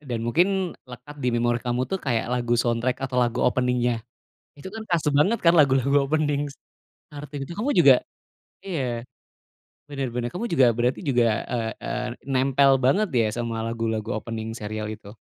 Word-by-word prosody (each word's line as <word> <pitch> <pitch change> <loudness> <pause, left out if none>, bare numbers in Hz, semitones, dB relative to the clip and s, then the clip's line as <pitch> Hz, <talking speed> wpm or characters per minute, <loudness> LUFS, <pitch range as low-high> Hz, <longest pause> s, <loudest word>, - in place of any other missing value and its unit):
dan 125 -6 -4
mungkin 180 +8 +1 0.2
lekat 125 +4 -11
di 125 - 0
memori 120 0 +1
kamu 125 +1 -1
tuh, 190 +6 -3
kayak 120 -5 -1
lagu 120 -1 +1
soundtrack 120 +2 0
atau 125 -1 0
lagu 120 0 +1
opening-nya? 125 -2 +1 0.6
Itu 145 - -8
kan 225 - -5
kerasa 165 -3 +1
banget 190 +11 +3
kan 170 0 +5
lagu-lagu 140 -3 +4
opening. 145 -2 0
s - - -13 0.6
Naruto 145 0 -9
yang 135 - -3
itu 170 - -8
kamu 255 +7 0
juga - - +8 0.7
iya. 170 -9 -3 1.1
Bener 135 -3 -3
bener. 120 -1 -1
Kamu 200 +7 -3
juga, 135 -8 +4
berarti 120 +2 0
juga, 125 -5 +2 0.3
eee 115 -2 -1
eee, - - -3 0.3
nempel 135 +1 +4
banget, 180 +12 +2
ya 110 - +3
sama 115 -1 -3
lagu-lagu 115 -1 -2
opening 110 0 -6
serial 105 -1 -5
itu? 110 -1 -9
125 Hz, 170 wpm, -24 LUFS, 120-145 Hz, 1.1 s, juga